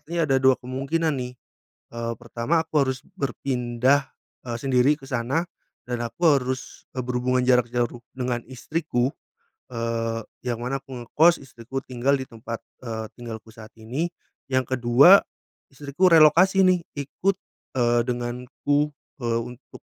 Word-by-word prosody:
artinya 165 +3 -3
ada 135 - +3
2 130 -1 +5
kemungkinan 140 +5 -1
nih, 125 -1 -4 0.6
eee, 115 0 -3
pertama 120 +7 0
aku 155 -3 +1
harus 130 -1 -2 0.2
berpindah, 130 0 0 0.3
eee, 120 -1 -3
sendiri 135 +1 +4
ke 135 - -12
sana 125 +5 0 0.5
dan 120 -1 -2
aku 170 +9 0
harus, 130 -2 -1
eee, 130 - -2
berhubungan 125 +1 +1
jarak 125 -2 +4
jauh 120 0 -1
dengan 125 -2 -2
istriku, 130 -1 -1 0.6
eee, 115 -1 -2 0.2
yang 120 -2 -2
mana 135 +2 -1
aku 130 -2 -8
ngekos 165 +7 +5
istriku 125 +1 -6
tinggal 130 +2 +1
di 130 - -4
tempat, 115 0 -7 0.2
eee, 110 -1 -4
tinggalku 115 -3 -8
saat 110 -1 -13
ini. 130 +10 -2 0.4
Yang 130 -1 0
ke-2 125 +11 +7 0.5
istriku 145 +6 +1
relokasi 170 +5 +6
nih 185 -1 +4 0.2
ikut, 180 +7 -1 0.4
eee, 120 -1 +3
denganku, 125 +4 -1 0.3
eee, 115 -1 0
untuk, 125 +2 -15
125 Hz, 140 wpm, -24 LUFS, 120-140 Hz, 0.6 s, ke-2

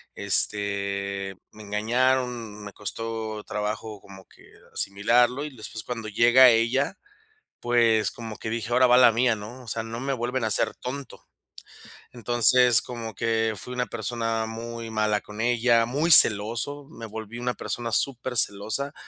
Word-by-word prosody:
este, 100 -1 -1 0.2
me 110 - -14
engañaron, 115 +1 -1
me 100 - -9
costó 110 0 -5
trabajo 105 0 -5
como 95 -1 -14
que - - -21 0.2
asimilarlo, 120 +7 +1
y 145 -4 -9
después 110 -1 -7
cuando 115 -2 -6
llega 120 +4 +6
ella, 125 - +1 0.6
pues 115 -2 +2
como 110 -3 -8
que 110 - -6
dije: 115 +1 -4
"Ahora 125 +1 +4
va 120 - +5
la 125 -2 +7
mía", 120 0 +2
¿no?, 115 +5 -10
o - - -16
sea, 115 +1 -3
no 115 +1 -6
me 135 +1 -2
vuelven 120 0 -2
a - - +1
hacer 105 - +1
tonto. 135 +2 -8 0.9
Entonces, 120 0 +4
como 115 -3 -7
que 110 0 0
fui 125 - -6
una 125 0 -1
persona 115 0 -3
muy 115 +1 -7
mala 105 -1 0
con 105 0 -12
ella, 120 -1 +3
muy 145 +8 0
celoso, 115 +5 +5
me 115 -8 -10
volví 110 +1 -8
una 125 0 -2
persona 120 -1 -5
supercelosa, 125 0 0
115 Hz, 150 wpm, -25 LUFS, 105-125 Hz, 0.9 s, la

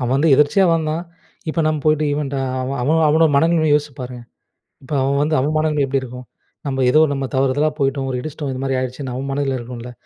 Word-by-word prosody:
அவன் 125 +1 0
வந்து 155 +3 +2
எதிர்ச்சியா 150 +7 +4
வந்தான். 160 +1 -1 0.5
இப்ப 165 - -1
நம்ம 155 -1 +1
போயிட்டு 155 0 +3
இவன்ட்ட 140 -2 -3 0.3
அவன் 135 +1 -3
அவன் 160 +4 +2
அவனோட 160 +1 +4
மனநிலமைய 160 0 +3
யோசிச்சு 150 -2 -1
பாருங்க. 125 -1 -7 0.6
இப்ப 140 - -7
அவன் 140 +1 +1
வந்து 155 +1 +1
அவன் 150 +4 0
மனநிலமை 155 -2 +1
எப்படி 135 0 0
இருக்கும்? 125 0 -9 0.4
நம்ப 135 -1 -2
ஏதோ 155 +5 +5
நம்ப 135 -1 -2
தவறுதலா 135 +3 +2
போயிட்டோம். 135 0 0
ஒரு 125 - -2
இடிச்சிட்டோம். 145 -1 -5
இது 130 - -5
மாதிரி 135 -1 -1
ஆயிருச்சுன்னு, 130 0 -4
அவன் 135 +1 -4
மனநில 135 -1 -1
இருக்கும்ல. 120 0 -8
140 Hz, 205 wpm, -19 LUFS, 130-155 Hz, 0.6 s, ஏதோ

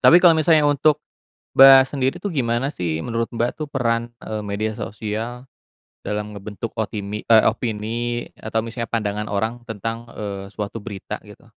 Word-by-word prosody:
Tapi 170 - +8
kalau 175 -1 +7
misalnya 160 -1 +4
untuk, 145 +1 +4 0.6
Mbak, 135 0 +10
sendiri 135 0 -1
tuh 200 - -1
gimana 130 -1 0
sih 80 - -2
menurut, 115 -1 -1
Mbak, 120 +1 +1
tuh 150 - -3
peran, 120 -4 0 0.2
eee, 110 -1 -3
media 105 +1 -2
sosial 110 +4 -5 0.6
dalam 105 0 -2
ngebentuk 105 +3 -6
otimi 105 -1 -3
eee, 110 -1 +6
opini 115 +1 -3
atau 110 0 -2
misalnya 115 0 -4
pandangan 105 -2 -1
orang 110 +3 -1
tentang, 115 +1 -4
eee, 100 -2 -5
suatu 105 +1 -4
berita 100 -3 -6
gitu? - - -15
115 Hz, 155 wpm, -22 LUFS, 105-125 Hz, 0.6 s, Mbak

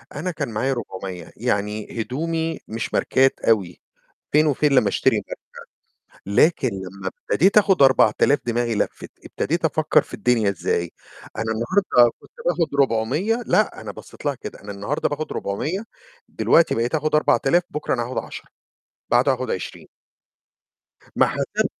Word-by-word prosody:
أنا 175 +5 -3
كان 150 -6 -4
معايا 125 +5 -1
400. 95 -7 -7
يعني 105 +2 -2
هدومي 160 +6 -2
مش 115 +1 -5
ماركات 135 +1 +2
أوي، 100 -6 0 0.5
فين 155 +1 +4
وفين 150 0 +2
لمّا 125 -6 +4
أشتري - - +2
ماركة، - - -6 0.8
لكن 130 - +3
لمّا 95 -1 -6 0.2
ابتديت 195 +7 +5
آخد 195 -6 +3
4000 135 +1 +4
دماغي 120 0 0
لفِّت. - - -3
ابتديت - - -2
أفكر - - +3
في - - -12
الدنيا 115 -5 +2
إزاي. 85 -2 -2 0.5
أنا 110 - -2
النهاردة 120 - +3
كنت - - -19 0.2
باخد 170 -3 0
400 150 - 0
لأ، - - +1
أنا - - -7
بصيت - - -13
لها 145 - +1
كده، 125 - -9
أنا 100 - -7
النهاردة 100 +10 -2
باخد 150 +1 -4
400، 155 - -3 0.4
دلوقتي 165 - +3
بقيت 120 +5 -1
آخد 155 0 0
4000 150 +2 +3
بُكرة 150 - -2
أنا 120 - -1
هاخد 125 +2 -4
10، - - -7 0.6
بعده 130 +3 +4
هاخد 130 0 -3
20. 95 - -5 1.3
ما - - +5
حسبتش - - -1
130 Hz, 145 wpm, -22 LUFS, 110-155 Hz, 1.3 s, ابتديت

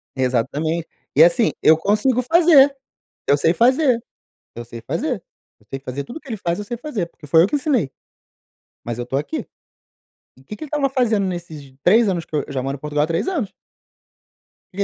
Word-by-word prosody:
Exatamente. 140 +6 -1 0.3
E 150 - +8
assim, 175 +7 +4
eu 155 0 +6
consigo 215 +8 +1
fazer, 285 -1 +5 0.5
eu 140 - +4
sei 165 +4 +2
fazer, 255 - +3 0.5
eu 120 - -7
sei 115 0 -9
fazer. - - -3 0.4
Eu 105 - -27
sei 135 - -4
fazer, 135 +1 -5
tudo 240 - -10
o 320 - -6
que 275 - -17
ele 225 - -3
faz 175 -4 -2
eu 210 - -4
sei 240 +4 -5
fazer, 235 - -4
porque 160 - -16
foi 160 +3 +5
eu - - +4
que - - -5
ensinei. 265 - 0 1.0
Mas 120 -1 -4
eu 120 - -4
tô 135 +2 -2
aqui. 310 - -3 0.9
E 130 - -19
que 210 - -8
que 310 - -9
ele 300 - -8
estava 285 -2 0
fazendo 230 -6 +1
nesses 165 -7 -6
3 215 +3 +5
anos 170 -3 -2
que 155 - -7
eu 145 - +1
eu - - -9
já 130 - -1
moro 135 +1 -2
em - - -23
Portugal 150 0 -1
há - - -1
3 165 +6 -1
anos. 265 - -2 1.2
Que 185 - -16
que 200 - +2
175 Hz, 215 wpm, -21 LUFS, -, 1.2 s, E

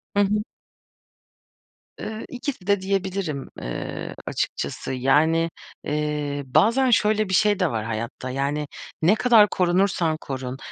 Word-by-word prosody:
Hı 205 - +4
hı. 210 +1 +1 1.6
Iıı, 215 +1 -5
ikisi 250 -6 -5
de 200 -1 +3
diyebilirim, 190 -6 -2
ııı, - - -5
açıkçası. - - -3
Yani, 155 +6 +3 0.3
eee, 150 -1 -2
bazen 220 - +3
şöyle 215 -2 +3
bir - - -2
şey 205 +1 +3
de 180 -6 +2
var 110 -2 -2
hayatta. 115 +3 -4
Yani, 140 +3 -1 0.3
ne 175 +7 +5
kadar 225 -3 +6
korunursan 180 -3 +1
korun, 130 -2 -5
170 Hz, 125 wpm, -24 LUFS, 140-205 Hz, 1.6 s, kadar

